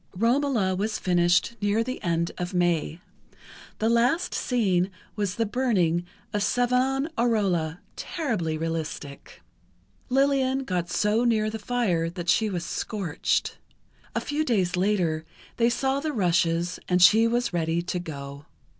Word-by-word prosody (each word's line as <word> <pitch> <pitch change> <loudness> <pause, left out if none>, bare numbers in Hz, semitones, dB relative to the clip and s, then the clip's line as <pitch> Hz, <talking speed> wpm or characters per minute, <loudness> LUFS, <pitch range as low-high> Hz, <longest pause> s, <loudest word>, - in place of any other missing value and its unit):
"Romola" 230 -4 +2
was 215 +3 -1
finished 175 +4 +2
near 205 +2 +2
the 255 +2 -5
end 170 -1 0
of 180 +1 -4
May. 175 -2 +1 0.8
The 220 - 0
last 240 +8 +2
scene 195 -7 +1 0.3
was 205 -3 -2
the 230 - 0
burning 195 -8 +1 0.3
of 205 - 0
Savonarola, 245 - +1
terribly 210 - -2
realistic. 155 -3 -5 0.7
Lillian 270 0 +2
got 180 -6 -2
so 210 +5 +1
near 215 -3 +2
the 220 - -5
fire 205 -8 0
that 175 0 -5
she 220 +3 +3
was 175 -3 -3
scorched. 190 -4 -2 0.6
A - - +2
few 295 +1 -1
days 190 - +1
later 180 -5 +1 0.3
they 235 0 +3
saw 265 +3 0
the 305 +1 -3
rushes 175 -3 +1
and 180 0 +3
she 215 +6 +7
was 240 -2 0
ready 165 0 0
to 180 0 -3
go. 140 -3 -8
200 Hz, 135 wpm, -26 LUFS, 175-240 Hz, 0.8 s, she